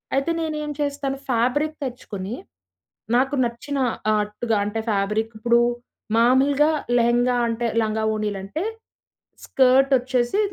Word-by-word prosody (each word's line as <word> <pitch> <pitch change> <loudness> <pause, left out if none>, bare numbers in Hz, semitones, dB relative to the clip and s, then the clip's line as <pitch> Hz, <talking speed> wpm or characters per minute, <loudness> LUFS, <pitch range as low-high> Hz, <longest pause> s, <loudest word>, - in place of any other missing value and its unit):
అయితే 275 +5 +1
నేనేం 300 -2 -3
చేస్తాను 280 -1 -2
ఫ్యాబ్రిక్ 255 +6 +1
తెచ్చుకొని, 220 -4 -6 0.8
నాకు 270 +2 +1
నచ్చిన 260 +5 -4 0.4
ఆట్టుగా 210 +2 -1
అంటే 215 +2 -3
ఫ్యాబ్రిక్ 210 +3 0
ఇప్పుడు 235 +1 +3 0.6
మాములుగా 275 +5 +4 0.3
లెహెంగా 240 +1 +2
అంటే 230 +1 -1 0.2
లంగావోణీలు 215 -2 -1
అంటే, 305 - -4 0.8
స్కర్ట్ 270 +1 +4
వచ్చేసి, 250 +6 0
245 Hz, 105 wpm, -23 LUFS, 220-275 Hz, 0.8 s, మాములుగా